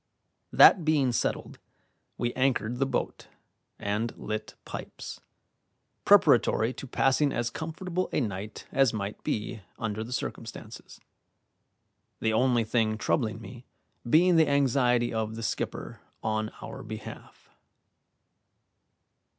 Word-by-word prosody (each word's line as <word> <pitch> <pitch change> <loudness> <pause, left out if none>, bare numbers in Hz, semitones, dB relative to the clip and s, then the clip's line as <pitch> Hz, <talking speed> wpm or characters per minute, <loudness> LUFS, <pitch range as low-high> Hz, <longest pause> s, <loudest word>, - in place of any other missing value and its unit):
That 180 - +7
being 150 -5 +2
settled, 115 - -2 0.6
we 120 0 -1
anchored 125 -3 0
the 135 - +2
boat, - - -3 0.5
and 105 +3 -2
lit 110 0 -5
pipes, - - -8 0.8
preparatory 115 +3 +5
to 135 - -8
passing 135 +3 +2
as 120 -2 -1
comfortable 175 +5 -3
a - - +1
night 105 -3 -4
as 135 -4 +3
might 100 -1 -4
be 110 +1 -3 0.2
under 110 -2 -3
the 115 - -9
circumstances, 125 - -6 1.2
the 110 0 +1
only 120 0 +3
thing 110 -1 +1
troubling 110 -3 0
me 120 +2 -11 0.4
being 175 +5 +5
the 160 -2 +5
anxiety 125 -4 +2
of 110 0 -2
the 115 - -6
skipper - - -4 0.2
on 110 0 -1
our 135 -1 -7
behalf. 110 -2 -10
120 Hz, 115 wpm, -28 LUFS, 110-135 Hz, 1.2 s, That